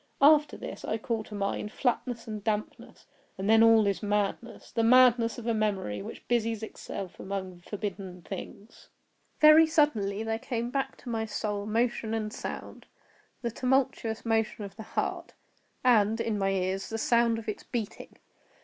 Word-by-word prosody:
After 295 +1 +5
this - - -8
I 220 - -1
call 225 0 -2
to 210 - -9
mind 205 +1 -2
flatness 245 -1 -1
and 215 -2 -6
dampness; 215 -1 -4 0.3
and 190 +1 -3
then 225 +1 +6
all 225 -1 +6
is 200 -1 0
madness—the 210 +3 -2
madness 240 -1 +5
of 240 - -8
a 230 - +1
memory 200 - -1
which - - -9
busies 230 -2 0
itself 195 -3 -7
among 190 -2 -5
forbidden 190 -2 -6
things. 200 +3 -9 0.5
Very 305 +1 +8
suddenly 225 -10 +1
there 225 0 -2
came 240 -2 -3
back 270 0 -2
to 250 - -7
my 225 -1 -1
soul 210 -1 -3
motion 225 0 0
and 215 -1 -3
sound—the 235 -2 -8
tumultuous 250 -3 0
motion 225 -1 0
of 195 0 -10
the 220 - -8 0.2
heart, - - -2 0.5
and, 225 -3 +4
in 225 -1 -1
my 195 0 +1
ears, 190 0 -1
the 225 - -3
sound 235 0 +3
of 225 - -8
its 215 - -3
beating. 225 -3 -6
220 Hz, 160 wpm, -29 LUFS, 205-235 Hz, 0.5 s, Very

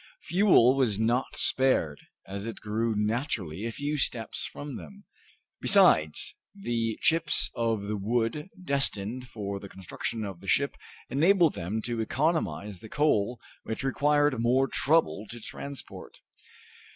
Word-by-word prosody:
Fuel 175 - +5
was 120 -7 +1
not 120 +4 0
spared, 130 - +1 0.3
as 100 +2 -6
it 115 - -6
grew 110 +1 -1
naturally 105 - -2
a - - -3
few 145 +5 -3
steps 115 -3 -1
from 145 -2 -7
them. 200 - -11 0.6
Besides, 80 - +4 0.2
the 115 - -2
chips 165 -2 +2
of 115 -3 -1
the 105 +1 -3
wood 115 - -1
destined 130 - -1
for 100 -4 -5
the 100 - -10
construction 95 +4 -5
of 95 -4 -7
the 95 - -13
ship 140 +7 +2 0.4
enabled 170 +3 +4
them 105 +6 -3
to 120 -2 -2
economize 110 - -1
the 110 - -11
coal, 125 -6 +1 0.2
which 110 - -5
required 145 -1 +2
more 130 +3 +3
trouble 145 -9 +1
to 120 - -8
transport. 140 +4 -8
115 Hz, 135 wpm, -28 LUFS, 105-145 Hz, 0.6 s, Fuel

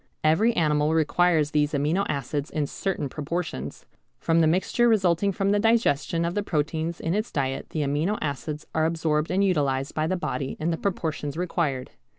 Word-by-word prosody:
Every 195 +10 +4
animal 150 -3 +2
requires 160 -1 +2
these 150 -1 +1
amino 155 +7 +1
acids 145 +1 -2
in 155 -2 -1
certain 185 0 -3
proportions. 150 - -4 0.3
From 165 +5 +2
the 160 - +4
mixture 190 +8 +2
resulting 195 -3 +3
from 195 +1 0
the 205 - +3
digestion 185 -7 +2
of 170 - -1
the 205 - 0
proteins 160 -1 -2
in 165 - -1
its 215 +3 -1
diet 135 -2 -2
the 155 - -2
amino 150 +9 0
acids 150 +1 -4
are 160 0 +2
absorbed 160 -2 0
and 190 +2 +2
utilised 140 -7 +1
by 155 0 0
the 185 - 0
body 135 -5 -3
in 160 +2 0
the 165 - -1
proportions 160 -6 -3
required. 165 -7 -1
160 Hz, 175 wpm, -25 LUFS, 150-180 Hz, 0.3 s, Every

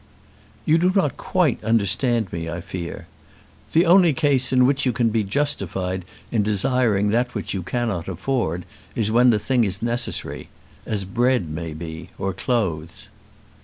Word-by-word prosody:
"You 160 +2 +4
do 180 +2 +3
not 150 -10 +2
quite 175 -12 0
understand 115 0 +1
me, 85 -1 -3
I 85 +1 -4
fear. 85 +1 -6 0.7
The 165 +3 +5
only 175 -2 +6
case 135 -4 +1
in 125 -1 +5
which 140 +2 +2
you 130 - +2
can 115 0 +1
be 110 -1 +1
justified 95 - -2 0.3
in 115 - +2
desiring 105 0 +2
that 120 +3 0
which 105 - -3
you 95 - -2
cannot 100 -3 -2
afford 95 -2 -2 0.3
is 110 -2 0
when 120 +2 +5
the 115 - +4
thing 120 +3 +1
is 95 -3 -2
necessary; 120 +1 -3 0.4
as 105 -3 -2
bread 120 -2 +1
may 80 0 -5
be, 80 +1 -7
or 95 0 -2
clothes." 90 -7 -2
110 Hz, 160 wpm, -22 LUFS, 95-125 Hz, 0.7 s, only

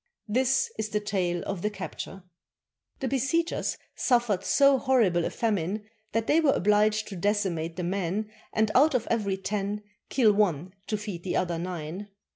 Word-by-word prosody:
This 260 +4 +2
is 220 0 -1
the 210 - 0
tale 185 -4 -1
of 195 -3 -3
the 210 - 0
capture: 195 -1 -7 0.4
— - - -49
The 265 - 0
besiegers 275 +6 0 0.2
suffered 240 -7 +1
so 275 -1 +5
horrible 220 -11 +3
a - - 0
famine 210 -2 -1 0.3
that 225 0 0
they 305 - +4
were 300 -4 +4
obliged 210 +2 +2
to 200 - -6
decimate 175 -4 -1
the 180 - -3
men 195 +4 -2 0.2
and 220 -1 +1
out 285 +2 +5
of 240 -2 0
every 205 -4 0
ten 205 +1 -3 0.3
kill 230 -6 +4
one 185 -4 +1
to 215 - -1
feed 205 -5 -6
the 185 - -2
other 175 -2 0
nine. 175 +2 -5
210 Hz, 170 wpm, -27 LUFS, 185-230 Hz, 0.4 s, so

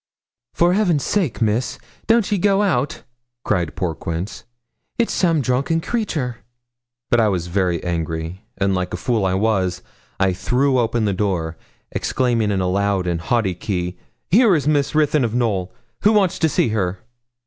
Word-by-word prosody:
'For 175 +1 +3
Heaven's 180 -8 +2
sake, 170 - 0
Miss, 110 +3 0 0.3
don't 225 -2 +3
ye 205 - +2
go 200 +2 +3
out,' 150 -8 0 0.4
cried 85 -3 0
poor 90 -3 -1
Quince; 85 +6 -5 0.5
'it's 235 - +1
some 165 -5 +2
drunken 135 +6 +1
creature.' 160 - -2 0.7
But 120 - +4
I 110 - +4
was 90 -4 -1
very 90 -2 0
angry, 80 +1 -3 0.2
and, 100 0 +1
like 90 -1 -2
a - - -4
fool 110 0 0
as 95 - 0
I - - +1
was, 95 -3 0 0.4
I 95 -1 +3
threw 130 +7 +1
open 115 -1 +1
the 100 - +1
door, 90 -5 -1 0.4
exclaiming 120 -4 0
in 100 -2 0
a 90 - 0
loud 100 0 +1
and 85 -2 -1
haughty 105 0 +1
key 90 -1 -3 0.3
'Here 215 -1 +6
is 145 -3 -1
Miss 145 -1 +1
Ruthyn 150 -2 +3
of 115 -1 -1
Knowl. 100 -7 0 0.3
Who 210 +2 +4
wants 195 -4 +2
to 160 - +3
see 130 - +1
her?' 100 -4 -1
110 Hz, 170 wpm, -21 LUFS, 90-150 Hz, 0.7 s, Here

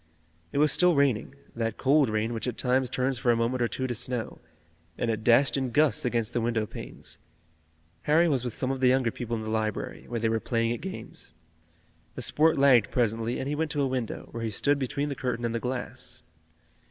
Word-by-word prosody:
It - - -3
was 150 0 +5
still 180 +3 +4
raining, 140 -3 +1 0.2
that 115 -1 -2
cold 140 -1 +3
rain 110 +2 -1
which 115 +2 -3
at 120 - -3
times 130 0 +1
turns 130 0 -1
for 120 - 0
a - - +3
moment 115 +2 0
or 120 - +3
two 130 - -3
to 125 - -2
snow, 125 0 -3 0.6
and 115 - 0
it 110 -1 -3
dashed 130 +5 +4
in 130 -2 -1
gusts 150 +2 +2
against 120 -2 0
the 120 - 0
window 115 -1 0
panes. - - -7 0.9
Harry 165 +3 +5
was 135 -6 +1
with 120 -3 -3
some 130 0 -2
of 135 - -3
the 130 - +4
younger 125 -2 +3
people 120 0 -4
in 110 - -4
the 110 - -4
library, 110 -1 -3
where 120 0 -3
they 115 - +1
were 110 0 +1
playing 115 0 0
at 120 - -6
games. 190 - -7 0.8
The - - -4
sport 160 +1 +3
lagged 135 -6 +5
presently 115 0 0
and 135 - -3
he 145 - -1
went 155 +1 -1
to 145 - -1
a - - +2
window, 130 -3 -4
where 115 - -5
he 115 - -1
stood 140 +7 +1
between 140 +2 -2
the - - -2
curtain 125 -2 -2
and 115 - -1
the 115 - -1
glass. 125 +1 -4
125 Hz, 225 wpm, -27 LUFS, 115-135 Hz, 0.9 s, was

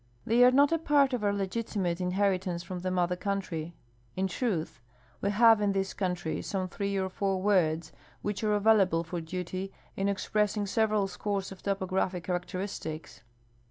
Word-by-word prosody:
They 235 +2 +5
are 250 - +9
not 280 +3 +4
a 330 - +2
part 285 -4 +3
of 240 -4 -1
our 205 - +3
legiti 200 +3 -3
mate 175 -2 0
inheritance 185 -1 0
from 180 +1 -5
the 185 +1 -2
mother 180 -1 +1
country. 180 -4 -3 0.4
In 190 - 0
truth, 175 - -2 0.4
we 200 - +1
have 225 +1 +6
in 205 -1 +2
this 195 0 -1
country 180 -4 -2
some 190 -2 -2
three 200 +2 -2
or 190 -1 0
four 195 0 -1
words 170 -5 +2 0.3
which 205 +1 -2
are 210 -1 +2
available 200 -5 +4
for 170 0 -4
duty 185 +3 -4 0.2
in 195 +1 0
express 210 +1 0
ing 205 - 0
several 215 0 +1
scores 195 +1 -3
of 190 - -10
topographic 190 -2 -1
characteristics. 180 -3 -4
195 Hz, 170 wpm, -29 LUFS, 180-205 Hz, 0.4 s, are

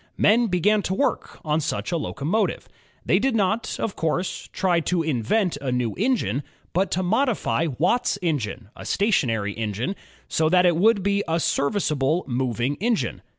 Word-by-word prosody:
Men 230 +3 +4
began 205 +3 +2
to 190 - -2
work 280 - -1
on 155 +1 +1
such 160 +3 -3
a - - 0
locomotive. 160 +6 -1 0.4
They - - +3
did 265 -3 +1
not, 215 +2 0
of 210 - -2
course, 165 +3 -2
try 180 -3 +1
to 170 +1 0
invent 155 - 0
a 140 -3 -3
new 125 -3 0
engine, 200 - 0 0.3
but 190 +2 +1
to 185 - 0
modify 220 -4 +1
Watt's 185 - +1
engine, 125 - -2
a - - -10
stationary 115 - +1
engine, 110 - -3 0.3
so 155 0 +1
that 180 +1 +4
it 175 -2 +4
would 205 +3 +3
be 200 0 +1
a 165 +1 +1
serviceable 150 0 0
moving 125 +1 -1
engine. 230 +3 -1
170 Hz, 160 wpm, -24 LUFS, 140-200 Hz, 0.4 s, Men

